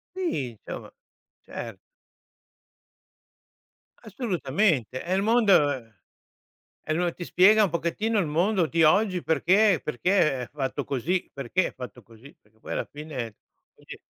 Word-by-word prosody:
Sì, 330 - -2
insomma, 110 - -9 0.5
cert - - -8 2.2
Assolutamente, 175 - -1
è 180 - -4
il 190 +1 +2
mondo 150 - +2 0.9
è - - -3
loa 175 +2 +1
ti 175 - -7
spiega 210 +5 +5
un 195 - -1
pochettino 170 +7 -1
il 190 - +1
mondo 175 +4 +1
di 165 +1 +1
oggi, 185 +3 +3
perché 185 +3 +3
perché 150 -2 +1
è 120 - -7
fatto 140 -1 -3
così, 165 +8 -2
perché 140 +7 -1
è - - -12
fatto 125 -1 -9
così, 115 +6 -17
perché 110 +1 -32
poi - - -7
alla - - -1
fine 150 0 -10
è 110 - -13 0.4
così. - - -12
165 Hz, 135 wpm, -26 LUFS, 135-195 Hz, 2.2 s, spiega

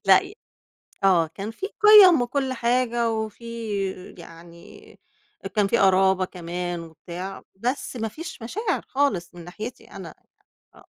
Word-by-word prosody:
لأ - - +7
ي 395 +1 -11 0.7
آه. 175 -4 +4
كان 200 +3 -5
فيه 385 - -6
قِيَم 400 -9 +8
وكل 260 +1 -1
حاجة، 235 -1 0
وفيه 220 -3 -5
يعني 170 0 -14 0.6
كان 205 -2 +3
في 235 - +1
قرابة 190 -1 +4
كمان 175 -1 -5
وبتاع، 170 +3 -8
بس 250 +6 -3
ما 225 -2 -2
فيش 310 +2 -9
مشاعر 385 - -2
خالص 210 -12 -1
من 175 - -11
ناحيتي 215 +8 -8
أنا - - -9 0.6
آه. - - -18
215 Hz, 130 wpm, -24 LUFS, 180-250 Hz, 0.7 s, قِيَم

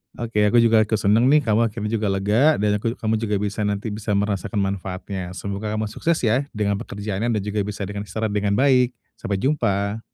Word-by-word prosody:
Oke, 110 -3 0
aku 115 +2 +4
juga 115 -1 +5
ikut 110 +1 +2
senang 110 +4 +3
nih, 150 +2 +5
kamu 115 0 +2
akhirnya 105 -1 -4
juga 110 -2 0
lega 105 +10 +3
dan 105 0 +1
aku 115 +3 -2
kamu 110 0 -1
juga 105 -2 -1
bisa 105 +1 -1
nanti 105 +2 -2
bisa 105 0 -2
merasakan 100 +1 -1
manfaatnya. 95 -1 -4
Semoga 100 +2 -4
kamu 110 -1 -2
sukses 170 0 0
ya, 125 +5 +2
dengan 100 -1 0
pekerjaannya, 105 -1 -4
dan 105 - 0
juga 105 +1 -2
bisa 105 -1 -4
dengan 100 +1 -5
istirahat 110 0 -2
dengan 100 -1 0
baik. 125 -1 +3 0.2
Sampai 100 - -2
jumpa. 100 -4 0
105 Hz, 200 wpm, -22 LUFS, 100-115 Hz, 0.2 s, juga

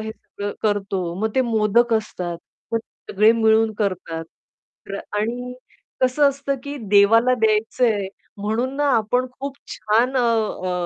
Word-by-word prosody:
हे 220 0 -5
सगळं 205 -1 -7
करतो 195 -4 -1
मग 220 0 0
ते 260 - +3
मोदक 230 0 +2
असतात 180 -6 -3 0.3
मग 230 - +2 0.3
सगळे 215 +3 +5
मिळून 220 -1 +3
करतात. 180 -5 -2 0.6
र 200 0 -4 0.2
आणि 245 +4 -3 0.5
कसं 260 +3 +4
असतं 280 0 -2
की 285 0 -5
देवाला 225 +5 +5
द्यायचंय, 215 -1 +1 0.3
म्हणून 220 +6 -2
ना, 290 0 +1
आपण 245 +4 +1
खूप 280 0 -5 0.2
छान 235 +5 +1
अ, - - +3 0.5
अ, - - -1
220 Hz, 140 wpm, -22 LUFS, 205-250 Hz, 0.6 s, सगळे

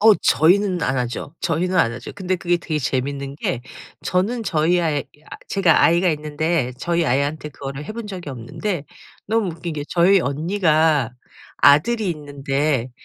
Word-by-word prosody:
어 220 0 +7
저희는 185 +1 +3
안 130 +1 0
하죠. 125 +5 -4
저희는 180 +2 0
안 115 - +3
하죠. 120 0 -8
근데 185 -2 -1
그게 175 0 +1
되게 160 -2 -3
재밌는 140 +1 -2
게 125 -5 -2 0.4
저는 215 +6 0
저희 170 -1 +2
아이 155 -3 +1
야 - - -4 0.4
제가 185 -6 +3
아이가 175 +2 +4
있는데 150 -2 -1
저희 170 +2 0
아이한테 145 +4 0
그거를 140 0 -7
해 - - -5
본 230 -2 -6
적이 180 -7 -6
없는데 140 - -4 0.4
너무 220 -2 +1
웃긴 165 0 -6
게 145 -1 -4
저희 180 +2 +4
언니가 155 - +2 0.5
아들이 185 +8 +4
있는데 140 -3 -2
155 Hz, 320 characters per minute, -21 LUFS, 140-180 Hz, 0.5 s, 어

